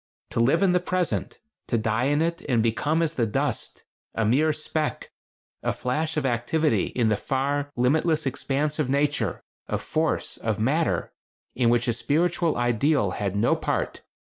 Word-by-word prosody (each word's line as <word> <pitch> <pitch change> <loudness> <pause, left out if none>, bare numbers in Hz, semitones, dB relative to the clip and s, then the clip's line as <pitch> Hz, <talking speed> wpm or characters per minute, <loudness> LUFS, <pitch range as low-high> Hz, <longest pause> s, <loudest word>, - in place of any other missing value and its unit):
To - - -1
live 135 +10 +3
in 190 - +4
the 180 - +3
Present; 180 -1 -1 0.3
to 120 - +1
die 110 +2 0
in 145 +3 +2
it 170 0 -2
and 115 -4 +3
become 150 +8 +1
as 165 -1 -1
the 120 -7 0
dust; 135 +1 -2 0.3
a 115 - +1
mere 145 +8 +3
speck, 155 0 -3 0.5
a - - 0
flash 155 +5 -2
of 150 - 0
activity 135 +6 +1
in 115 -3 0
the 110 - +3
far, 140 +5 -1
limitless 155 +5 +2
expanse 145 +3 -1
of 145 -4 0
Nature, 145 +2 0 0.2
of - - -2
Force, 160 +1 -1
of 110 -2 -2
Matter 150 +9 0 0.4
in 120 -1 +2
which 120 +1 +2
a 120 - +2
spiritual 160 +7 +1
ideal 120 -1 +2
had 100 0 -2
no 105 +4 +3
part. - - -2
140 Hz, 165 wpm, -25 LUFS, 120-155 Hz, 0.5 s, in